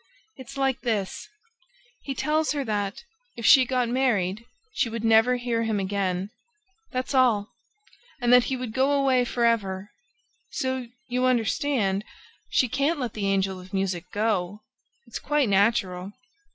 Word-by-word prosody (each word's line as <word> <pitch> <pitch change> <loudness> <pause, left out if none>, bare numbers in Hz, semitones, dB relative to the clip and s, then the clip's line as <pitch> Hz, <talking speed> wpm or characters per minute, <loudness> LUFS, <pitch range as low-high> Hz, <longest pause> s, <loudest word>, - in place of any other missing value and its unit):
It's 265 +1 -11
like 270 -1 0
this: 215 -6 -2 0.7
he 275 - -5
tells 305 +2 +1
her 285 -2 -2
that, 205 - -2 0.3
if 230 - -5
she 265 -4 +7
got 250 -1 0
married, 230 -5 0 0.3
she 245 - 0
would 230 0 -5
never 225 +2 +5
hear 240 -2 -1
him 220 -2 0
again. 195 0 -2 0.6
That's 255 +2 -3
all!... 235 -6 +3 0.7
And 245 -1 +3
that 250 0 +7
he 265 - -1
would 250 -3 -5
go 265 +3 +2
away 265 -3 +3
for 240 0 0
ever!... 205 -4 0 0.6
So, 260 -1 -3 0.2
you 250 +1 0
understand, 235 -4 +1 0.5
she 255 - +2
can't 280 +6 0
let 245 -3 -3
the 205 -2 -2
Angel 190 -1 0
of 185 +1 -14
Music 185 -2 -1
go. 205 -2 -1 0.4
It's - - -7
quite 295 -3 +1
natural." 195 -2 +1
230 Hz, 150 wpm, -25 LUFS, 200-260 Hz, 0.7 s, she